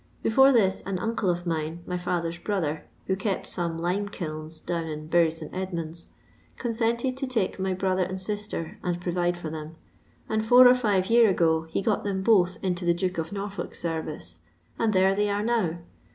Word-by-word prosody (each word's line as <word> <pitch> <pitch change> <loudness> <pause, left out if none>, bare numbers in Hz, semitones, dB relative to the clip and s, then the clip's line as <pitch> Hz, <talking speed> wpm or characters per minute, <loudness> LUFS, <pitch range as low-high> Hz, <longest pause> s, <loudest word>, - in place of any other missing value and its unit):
Before 265 +5 +6
this 195 -7 +3
an 195 -1 -1
uncle 225 -1 -1
of 175 0 -1
mine, 165 0 -3
my 180 - -3
dither's 175 -1 -2
brother, 165 -7 -1 0.2
who 190 - 0
kept 200 -1 -2
some 170 -2 -3
lime 185 +5 -1
kilns 155 -3 -6
down 170 0 -3
m 155 -1 -5
Bury 165 +1 +4
St. 160 -1 -8
Edmunds, 170 -3 -4 0.5
consented 235 +2 0
to 270 0 -2
take 220 -7 -1
my 190 0 0
brother 185 0 0
and 185 +1 -2
sister 205 -4 -4
and 175 -1 -2
provide 175 0 0
for 165 -3 -6
them, 155 0 -7 0.5
and 220 0 0
four 245 +3 +8
or 245 - +8
five 210 -6 +1
year 230 -2 +6
ago 160 -3 +2
he 180 - -2
got 215 0 +1
them 195 -2 -2
both 190 -4 +4
into 180 -1 -1
the 170 0 +3
Duke 180 0 -1
of 160 0 -3
Norfolk's 200 0 -5
service, 155 - -5 0.4
and 225 -1 +2
thero 190 -1 +4
they 205 +1 +1
are 205 +1 0
now. 215 -8 +1
185 Hz, 190 wpm, -26 LUFS, 165-205 Hz, 0.5 s, four